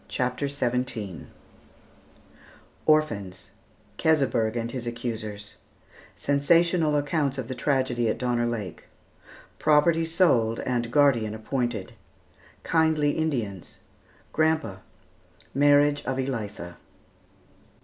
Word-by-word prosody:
] -, -, -30 dB
CHAPTER 125 Hz, +2 st, -1 dB
XVII 125 Hz, -, -3 dB, 1.6 s
ORPHANS 110 Hz, -13 st, +1 dB, 0.5 s
KESEBERG 130 Hz, -8 st, +2 dB
AND 115 Hz, 0 st, -3 dB
HIS 120 Hz, -2 st, -5 dB
ACCUSERS 110 Hz, -3 st, -5 dB, 0.6 s
SENSATIONAL 160 Hz, +2 st, +2 dB
ACCOUNTS 145 Hz, -1 st, 0 dB
OF 130 Hz, -3 st, -4 dB
THE 130 Hz, -, -4 dB
TRAGEDY 130 Hz, -3 st, 0 dB
AT -, -, -1 dB
DONNER 120 Hz, -1 st, 0 dB
LAKE 105 Hz, -7 st, -5 dB, 0.7 s
PROPERTY 160 Hz, +2 st, +3 dB
SOLD 130 Hz, -10 st, +2 dB
AND 120 Hz, -2 st, -1 dB
GUARDIAN 120 Hz, -7 st, +3 dB
APPOINTED 120 Hz, -3 st, -3 dB, 0.7 s
KINDLY 160 Hz, -3 st, +2 dB
INDIANS 120 Hz, -, -3 dB, 0.6 s
"GRANDPA" 155 Hz, -12 st, 0 dB, 0.7 s
MARRIAGE 145 Hz, +1 st, +4 dB
OF 135 Hz, -, -2 dB
ELITHA. 105 Hz, -9 st, -4 dB
130 Hz, 90 wpm, -26 LUFS, 115-145 Hz, 1.6 s, MARRIAGE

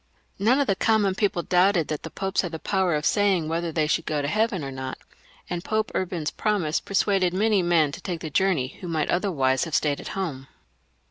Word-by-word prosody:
None 235 Hz, +7 st, +3 dB
of 285 Hz, -, +3 dB
the 195 Hz, -, +1 dB
common 210 Hz, -2 st, +2 dB
people 190 Hz, -3 st, 0 dB
doubted 180 Hz, -2 st, +3 dB
that 155 Hz, -, -3 dB
the 160 Hz, -, -7 dB
Popes 195 Hz, +3 st, -1 dB
had 175 Hz, -3 st, -5 dB
the -, -, -2 dB
power 190 Hz, -1 st, 0 dB
of 150 Hz, +2 st, -2 dB
saying 195 Hz, -6 st, +2 dB
whether 165 Hz, +1 st, -2 dB
they 155 Hz, -1 st, +1 dB
should 165 Hz, +2 st, 0 dB
go 155 Hz, -1 st, 0 dB
to -, -, -1 dB
heaven 210 Hz, -2 st, 0 dB
or 135 Hz, -, -5 dB
not, 130 Hz, 0 st, -5 dB, 0.5 s
and 175 Hz, -1 st, -4 dB
Pope 215 Hz, 0 st, -1 dB
XJrban's 175 Hz, -4 st, -2 dB
promise 195 Hz, -8 st, 0 dB
persuaded 195 Hz, -2 st, +1 dB
many 210 Hz, 0 st, +3 dB
men 170 Hz, -4 st, +3 dB
to -, -, -8 dB
take 175 Hz, -4 st, -4 dB
the 155 Hz, -, -5 dB
journey 160 Hz, -7 st, +1 dB
who 180 Hz, -, -6 dB
might 160 Hz, -3 st, -1 dB
otherwise 140 Hz, -9 st, +1 dB
have 160 Hz, -2 st, -3 dB
stayed 145 Hz, -2 st, +1 dB
at -, -, -9 dB
home. 140 Hz, -9 st, -4 dB
175 Hz, 215 wpm, -25 LUFS, 155-195 Hz, 0.5 s, None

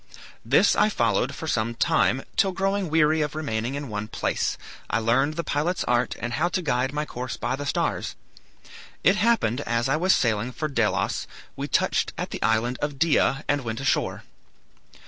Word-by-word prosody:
This -, -, +4 dB
I 210 Hz, -, +4 dB
followed 125 Hz, -, 0 dB
for 160 Hz, -, -6 dB
some 115 Hz, -4 st, 0 dB
time, 130 Hz, +3 st, +2 dB
till 190 Hz, -1 st, +2 dB
growing 195 Hz, -1 st, 0 dB
weary 155 Hz, 0 st, +3 dB
of 150 Hz, 0 st, -2 dB
remaining 125 Hz, -4 st, -2 dB
in 145 Hz, 0 st, -4 dB
one 105 Hz, -1 st, -4 dB
place, -, -, -1 dB, 0.3 s
I -, -, +1 dB
learned 125 Hz, +7 st, +2 dB
the 170 Hz, -, -2 dB
pilot's 160 Hz, +5 st, -1 dB
art 120 Hz, 0 st, +1 dB
and 120 Hz, +1 st, -4 dB
how 160 Hz, +8 st, +1 dB
to 185 Hz, -, -1 dB
guide 130 Hz, -3 st, 0 dB
my 150 Hz, +1 st, -2 dB
course 125 Hz, -2 st, -5 dB
by 130 Hz, -, -1 dB
the 145 Hz, +1 st, -5 dB
stars. -, -, -1 dB, 0.9 s
It 195 Hz, +2 st, +4 dB
happened 190 Hz, -, +2 dB
as 120 Hz, -1 st, 0 dB
I 135 Hz, +3 st, +2 dB
was 185 Hz, +4 st, +4 dB
sailing 115 Hz, +1 st, 0 dB
for 155 Hz, +2 st, -2 dB
Delos 115 Hz, -9 st, 0 dB, 0.3 s
we -, -, -4 dB
touched -, -, +1 dB
at -, -, -4 dB
the -, -, -5 dB
island 115 Hz, +3 st, +1 dB
of 145 Hz, -1 st, -2 dB
Dia 150 Hz, -2 st, +2 dB
and 145 Hz, 0 st, +1 dB
went 115 Hz, -1 st, -4 dB
ashore. 135 Hz, -, 0 dB
140 Hz, 185 wpm, -25 LUFS, 120-155 Hz, 0.9 s, This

